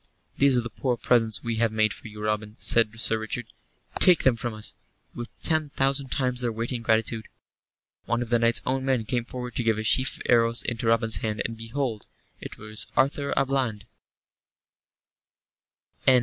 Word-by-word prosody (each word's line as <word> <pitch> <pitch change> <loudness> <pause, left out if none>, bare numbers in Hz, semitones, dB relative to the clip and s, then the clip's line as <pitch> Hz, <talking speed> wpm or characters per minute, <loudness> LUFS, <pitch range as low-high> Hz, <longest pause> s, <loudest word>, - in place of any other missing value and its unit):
"These 140 -2 +4
are - - +2
the 120 -1 -7
poor 125 +2 -1
presents 115 -3 +2
we 115 -2 -2
have 115 -1 +2
made 110 -1 +1
for - - -10
you, 105 -1 -9
Robin," 105 0 -2
said 115 -1 +2
Sir 110 -1 +2
Richard. 110 +2 -4 0.5
"Take 180 -2 +7
them 130 -3 +4
from 120 +1 -3
us, 105 - -6 0.4
with 120 0 -7
ten 155 -2 0
thousand 135 0 +1
times 125 -2 -1
their 120 -2 0
weight 115 +3 -4
in 120 -2 -3
gratitude." 110 -1 0 0.8
One 120 +1 0
of 120 - -11
the 120 - +4
knight's 115 0 +2
own 130 +1 -1
men 130 -4 0
came 120 +1 -1
forward 125 0 -6
to 120 - 0
give 110 -1 +2
a 110 - -3
sheaf 130 +4 +1
of - - -9
the - - -1
arrows 115 -1 +3
into 115 -1 -2
Robin's 115 0 +2
hand, 105 -2 -2
and, 115 - -3
behold, 115 0 -4 0.3
it - - -9
was 110 0 -1
Arthur 140 +1 +1
à 135 - +4
Bland! 130 -6 -1
115 Hz, 190 wpm, -26 LUFS, 110-130 Hz, 0.8 s, Take